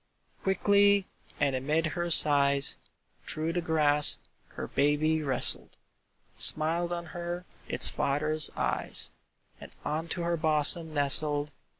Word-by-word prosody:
Quickly, 200 +1 +1 0.3
and 140 -2 -1
amid 150 +5 -2
her 175 -1 -4
sighs, 140 -3 +3 0.5
Through 160 +2 -5
the 175 - -3
grass 150 -3 +3 0.4
her - - -7
baby 150 +3 -1
wrestled, 135 -4 -1 0.6
Smiled 165 +3 +3
on 170 0 -5
her 175 0 -7 0.2
its - - +4
father's 155 +2 0
eyes, - - +2 0.5
And - - -13 0.2
unto 165 +3 -4
her 170 0 -2
bosom 155 +1 +2
nestled. 145 0 0
155 Hz, 110 wpm, -27 LUFS, 145-170 Hz, 0.6 s, its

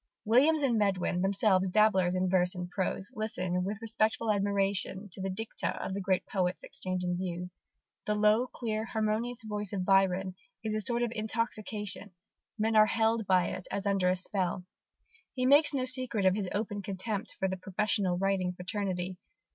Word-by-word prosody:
Williams 285 +8 +4
and 240 -5 +2
Medwin, 190 -3 +1
themselves 190 -1 +3
dabblers 190 -3 +3
in 185 0 +1
verse 180 -1 +2
and 180 0 -5
prose, 190 +1 -2
listen 185 -5 -2
with 200 +3 -3
respectful 220 0 +1
admiration 200 0 0
to 190 - -5
the 195 - -2
dicta 220 +4 -3
of - - -4
the 200 - -3
great 185 -1 0
poets 185 -2 -1
exchanging 180 -1 -3
views. 180 0 -5 0.5
The 210 - +1
low, 210 +4 +3
clear, 220 -3 -3
harmonious 225 +2 -1
voice 210 -2 -3
of 185 -2 -2
Byron 190 -1 +3 0.3
"is 220 -1 -2
a 215 - 0
sort 235 +3 0
of 235 - -1
intoxication: 215 -3 -3 0.4
men 220 +1 +1
are 215 0 +7
held 225 -1 +1
by 185 -2 +3
it 185 - -6
as 200 - -3
under 195 -2 +2
a 185 - +2
spell." 185 -1 -2 0.7
He 255 -1 0
makes 290 +3 +6
no 265 -3 -1
secret 255 -5 +1
of 185 - +5
his 200 -3 -2
open 205 -1 -2
contempt 200 +3 -4
for 190 - 0
the 190 - -2
professional 190 -1 0
writing 190 -1 0
fraternity. 185 -1 -3
200 Hz, 170 wpm, -30 LUFS, 185-220 Hz, 0.7 s, are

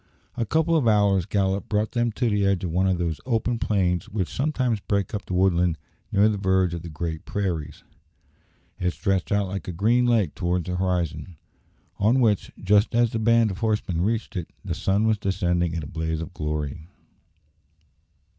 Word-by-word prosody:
A 115 - -2
couple 160 +4 +2
of 145 -7 +2
hours' 100 -4 +3
gallop 100 -1 0
brought 105 0 0
them 120 -1 0
to 120 +2 0
the 105 -2 +1
edge 100 -2 +1
of 90 - -2
one 95 +3 +2
of 95 -1 +2
those 85 -4 -2
open 120 -1 0
plains 90 -6 0
which 95 -4 -3
sometimes 130 -6 0
break 100 -1 -1
up 105 -1 -4
the 90 - -2
woodland 90 -2 +2 0.3
near 100 +2 +4
the 105 -2 0
verge 95 -2 +2
of 85 - -4
the 85 - -8
great 80 0 -4
prairies. 90 -7 -3 1.0
It 90 0 0
stretched 95 -4 -1
out 100 -1 +2
like 95 +1 -5
a - - -2
green 115 +8 +2
lake 110 -9 +2
towards 90 -1 -1
the 90 -1 -3
horizon, 85 -3 -2 0.6
on 115 +6 +3
which, 110 -5 +2
just 105 +4 +3
as 120 -1 +3
the 115 - -2
band 115 -1 +3
of 95 - -6
horsemen 105 -7 0
reached 110 +3 -1
it, 90 -3 -4 0.2
the - - -2
sun 100 +3 +1
was 110 -2 +2
descending 90 -3 0
in 80 - -3
a - - -6
blaze 80 0 -3
of 85 +3 -7
glory. 75 0 -4
95 Hz, 190 wpm, -24 LUFS, 85-110 Hz, 1.0 s, near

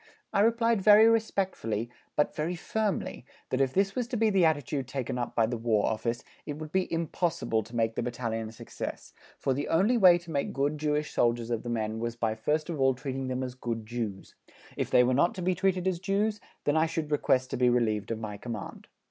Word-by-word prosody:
I - - +2
replied 230 0 +3
very 210 +2 +8
respectfully, 190 - 0 0.2
but 150 - +1
very 160 +4 -1
firmly, 210 - -2 0.3
that 130 - +1
if 135 -1 +2
this 195 +3 +1
was 245 0 -2
to 245 -1 -3
be 220 -1 +3
the 190 -3 +4
attitude 145 -4 0
taken 130 -2 -3
up 120 - -3
by 115 - +4
the 120 +1 -3
War 110 -2 +2
Office, 115 +2 -2 0.2
it 145 - -4
would 155 -1 -7
be 190 +1 0
impossible 165 -7 0
to 115 +3 -11
make 115 -1 +1
the - - -2
Battalion 115 -2 -3
a - - -10
success, 115 - -7 0.2
for 135 - 0
the 145 +3 -2
only 200 +9 +3
way 180 -4 +8
to 170 -1 -10
make 140 -2 -1
good 145 +2 0
Jewish 150 0 -1
soldiers 120 0 +1
of 115 -2 0
the 120 - -6
men 110 -1 -2
was 120 0 -3
by 115 -2 0
first 150 +8 -1
of 160 -5 -3
all 135 -1 +4
treating 135 0 -4
them 130 0 -2
as 125 -1 -4
good 115 -3 -4
Jews; 110 -4 -5 0.4
if - - -2
they 125 - +6
were 125 +1 +2
not 170 - +3
to 185 - -4
be 185 +1 +2
treated 185 -1 0
as 180 -2 0
Jews, 205 +2 0 0.2
then 145 - +1
I 160 +1 +3
should 160 -2 -3
request 130 -3 +2
to - - -2
be 125 0 +4
relieved 110 -4 +1
of 115 - -2
my 105 -2 -6
command. 110 -3 -7
135 Hz, 225 wpm, -29 LUFS, 115-180 Hz, 0.4 s, very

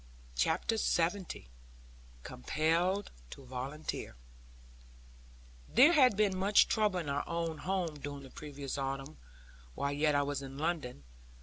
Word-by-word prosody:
CHAPTER 165 - +1
LXX 175 - 0 0.8
COMPELLED 165 - 0 0.2
TO 135 - -11
VOLUNTEER 130 - -5 1.5
There 300 +7 +7
had 255 - +5
been 210 -2 +4
some 200 +2 0
trouble 210 -3 +4
in 165 - -5
our 140 0 -1
own 165 -2 -2
home 180 -5 -2
during 145 0 -6
the 135 - -12
previous 140 -2 -6
autumn, 135 +2 -4 0.6
while 140 - -1
yet 150 +1 +2
I 145 - +3
was 140 -1 -2
in 135 0 -8
London. 150 - -2
155 Hz, 125 wpm, -33 LUFS, 140-185 Hz, 1.5 s, There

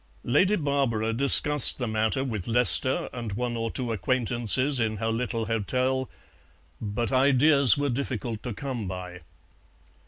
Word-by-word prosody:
Lady 185 +12 +2
Barbara 135 - -1
discussed 140 +2 +4
the 125 - -4
matter 110 +4 -1
with 110 -9 -5
Lester 125 +2 +2
and 115 -4 -6
one 120 +2 -3
or 115 0 -3
two 120 0 -3
acquaintances 120 +3 0
in 110 -2 -2
her 110 +2 -3
little 115 0 -3
hotel, 130 +4 -2 0.7
but 110 +3 -3
ideas 140 0 +4
were 145 0 -1
difficult 120 -4 -4
to 125 - -6
come 120 -3 -6
by. 90 -1 -8
120 Hz, 135 wpm, -25 LUFS, 110-130 Hz, 0.7 s, discussed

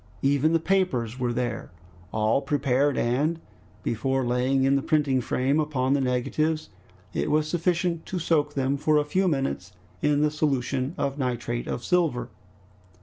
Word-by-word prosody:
Even 140 +3 +3
the 165 - +3
papers 155 - 0
were 125 -1 0
there, 120 0 -3 0.4
all 110 +4 +1
prepared, 140 -1 +1
and 145 +8 +1 0.4
before 130 +3 0
laying 125 +2 +1
in 135 +1 +3
the 140 - +2
printing 140 -3 +1
frame 135 +5 +1
upon 140 -3 0
the 140 - +2
negatives, 155 +5 0 0.4
it - - -1
was 155 0 +2
sufficient 170 0 0
to 185 - -3
soak 150 -3 +1
them 135 0 0
for 150 +2 +2
a 150 - +2
few 185 +6 +1
minutes 135 - -2 0.3
in 150 -1 +2
the 150 0 +2
solution 140 -1 -1
of 140 0 -2
nitrate 120 -2 -2
of 120 - -3
silver. 150 -9 +1
140 Hz, 155 wpm, -26 LUFS, 125-155 Hz, 0.4 s, Even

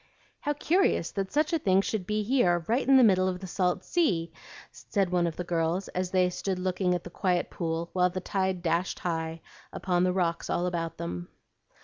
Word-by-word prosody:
"How 295 - -1
curious 320 - +1
that 195 -1 -3
such 305 +3 +1
a 330 - +2
thing 195 -7 +3
should 200 -2 -3
be 210 0 0
here 185 -8 +2
right 240 +4 +1
in 270 0 +7
the 260 - +7
middle 185 -4 +4
of 180 -1 -2
the 190 - -7
salt 180 -1 0
sea!" 185 - +1 0.4
said 195 -4 -2
one 175 -1 +2
of 165 - -4
the 180 - -4
girls, 170 +2 -1
as 185 0 -2
they 185 -1 +3
stood 190 +1 -2
looking 180 0 0
at 175 - -4
the 175 - -9
quiet 180 -1 0
pool 165 0 -3
while 180 -1 +3
the 185 +1 -4
tide 190 -1 -1
dashed 170 +2 0
high 165 -1 -3 0.3
upon 180 -2 0
the 185 - +3
rocks 175 -2 -1
all 175 - 0
about 165 -2 -3
them. 85 +1 -5
180 Hz, 210 wpm, -28 LUFS, 170-195 Hz, 0.4 s, in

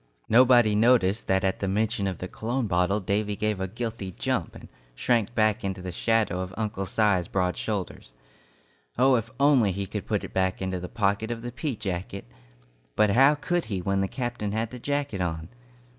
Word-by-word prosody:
Nobody 120 -2 +5
noticed 110 -2 +3
that 95 0 +2
at 95 0 0
the 100 - -2
mention 105 +1 0
of 95 -3 -3
the 90 - -5
cologne 120 +6 -2
bottle, 90 +1 +1
Davy 105 +1 -1
gave 105 -1 -1
a 95 - -2
guilty 110 -2 -5
jump, - - -2
and - - -11 0.3
shrank 120 - 0
back 110 +1 +2
into 95 -1 -3
the 90 0 -5
shadow 110 -1 +1
of 95 0 -5
Uncle 105 -3 -3
Si's 100 -3 +2
broad 90 -2 0
shoulders. 95 - -5 0.8
Oh, 130 +2 +5
if 115 -3 +2
he - - -19
could 130 - -23
only 130 -10 +4
put - - -3
it - - -8
back 95 0 0
into 95 -1 -2
the 90 0 -7
pocket 105 0 0
of 115 -1 -4
the 120 - -5
pea 140 +1 -3
jacket! 95 - -5 0.7
But 105 -1 +4
how 135 +7 +5
could 175 +4 -1
he 100 -4 -3
when 95 +2 0
the 95 - 0
captain 120 -4 -3
had 110 +1 -2
the 125 - -8
jacket 140 -6 -2
on? 80 -2 -3
105 Hz, 195 wpm, -26 LUFS, 95-120 Hz, 0.8 s, Nobody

